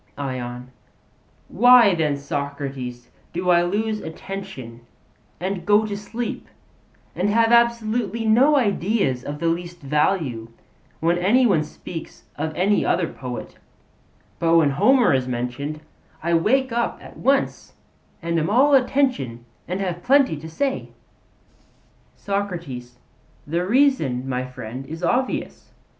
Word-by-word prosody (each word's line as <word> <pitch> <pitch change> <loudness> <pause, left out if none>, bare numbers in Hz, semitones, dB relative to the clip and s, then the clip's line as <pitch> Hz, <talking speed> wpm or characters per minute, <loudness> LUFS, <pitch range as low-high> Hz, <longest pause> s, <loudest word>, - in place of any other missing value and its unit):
ION: 125 -2 -5 0.8
Why 240 -2 +6
then, 155 -4 0
Socrates, 140 -4 -5 0.2
do 180 +1 +1
I 175 0 +5
lose 215 +5 -1
attention 160 -9 -8 0.6
and 185 0 -3
go 205 +3 +4
to 205 -1 -4
sleep 225 +4 -5 0.7
and 190 +3 0
have 225 +2 +3
absolutely 235 -2 +2
no 255 +7 +5
ideas 200 - +1
of 145 +1 -5
the 170 - -4
least 175 +1 -2
value, 145 -5 0 0.5
when 170 +2 +2
any 230 +8 +4
one 175 -9 +3
speaks 165 +2 -9
of 155 +2 -3
any 200 +3 +2
other 175 -2 +1
poet; 125 -5 -7 0.8
but 165 0 +3
when 150 -4 +4
Homer 245 - +4
is 130 -1 0
mentioned, 125 +5 -4 0.4
I 170 +1 0
wake 255 +10 +2
up 235 0 -1
at - - -13
once 275 +2 0 0.5
and 170 0 0
am 155 - -1
all 270 +7 +4
attention 250 - +1 0.2
and 185 +2 -3
have 175 -2 -3
plenty 270 - +4
to 160 +2 -9
say? 270 - -2 1.3
SOCRATES: 170 -12 -4 0.5
The 170 +4 -1
reason, 190 - +2
my 130 -1 -2
friend, 125 0 -7
is 165 +3 -7
obvious. 250 +9 -2
175 Hz, 125 wpm, -22 LUFS, 140-220 Hz, 1.3 s, Why